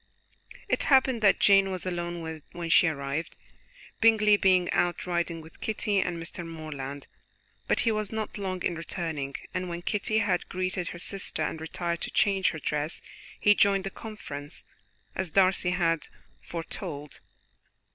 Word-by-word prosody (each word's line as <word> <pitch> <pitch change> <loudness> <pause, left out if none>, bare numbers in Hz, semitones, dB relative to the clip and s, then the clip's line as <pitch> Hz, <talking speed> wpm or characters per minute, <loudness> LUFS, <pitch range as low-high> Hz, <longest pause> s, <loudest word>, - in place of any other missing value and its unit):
It - - +1
happened 265 -4 +5
that 200 -2 +5
Jane 195 -1 +6
was 185 -1 -4
alone 175 -3 -4
when 170 -1 -4
she 170 - +7
arrived, 140 +1 -3 0.6
Bingley 215 -2 +6
being 185 -3 +4
out 175 0 +1
riding 170 -2 -1
with 160 0 -15
Kitty 210 -2 0
and 175 -2 -1
Mr. 165 +1 -5
Morland; 150 -4 -6 0.6
but - - +2
he 230 - +3
was 215 -2 -1
not 220 -1 -4
long 185 -2 -3
in - - +1
returning, 160 -4 -4 0.2
and 185 -1 -2
when 170 0 -5
Kitty 210 +3 0
had 195 -5 +1
greeted 185 -1 -2
her 175 - -5
sister, 175 -2 -3
and 160 +1 -3
retired 170 +1 -3
to - - -3
change 195 -2 +3
her - - -5
dress, 150 +2 -2 0.4
he 205 - +6
joined 200 -2 +3
the 195 - -4
conference, 145 -11 -7 0.5
as 190 -2 -2
Darcy 185 0 +3
had 165 -3 +1 0.3
foretold. 165 -3 -6
175 Hz, 155 wpm, -28 LUFS, 165-195 Hz, 0.6 s, she